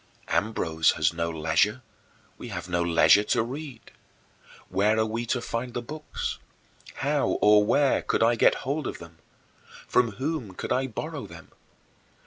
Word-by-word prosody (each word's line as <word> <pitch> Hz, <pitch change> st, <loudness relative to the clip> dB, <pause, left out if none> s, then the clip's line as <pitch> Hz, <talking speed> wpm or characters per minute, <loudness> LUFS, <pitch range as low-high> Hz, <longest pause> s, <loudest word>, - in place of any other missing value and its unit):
Ambrose 80 Hz, -7 st, +1 dB
has 75 Hz, -1 st, +1 dB
no 85 Hz, 0 st, -2 dB
leisure 80 Hz, +9 st, +1 dB, 0.6 s
we -, -, -7 dB
have -, -, -6 dB
no 90 Hz, -1 st, 0 dB
leisure 85 Hz, +4 st, +5 dB
to 110 Hz, -, +1 dB
read. 135 Hz, +2 st, -8 dB, 0.8 s
Where 105 Hz, +3 st, +1 dB
are 110 Hz, -, +2 dB
we 115 Hz, +2 st, -3 dB
to 125 Hz, -, 0 dB
find 120 Hz, +1 st, -4 dB
the 120 Hz, -, -2 dB
books? 150 Hz, +5 st, -5 dB, 0.6 s
How -, -, 0 dB
or 105 Hz, 0 st, +6 dB
where 140 Hz, +6 st, +2 dB
could -, -, 0 dB
I 115 Hz, +1 st, +4 dB
get 115 Hz, -, +4 dB
hold 140 Hz, +1 st, -2 dB
of -, -, -5 dB
them? 85 Hz, -1 st, -14 dB, 0.7 s
From 120 Hz, -4 st, +2 dB
whom 130 Hz, -, -4 dB
could -, -, -6 dB
I 130 Hz, +1 st, +1 dB
borrow 115 Hz, -, -6 dB
them? -, -, -13 dB
110 Hz, 155 wpm, -26 LUFS, 85-125 Hz, 0.8 s, or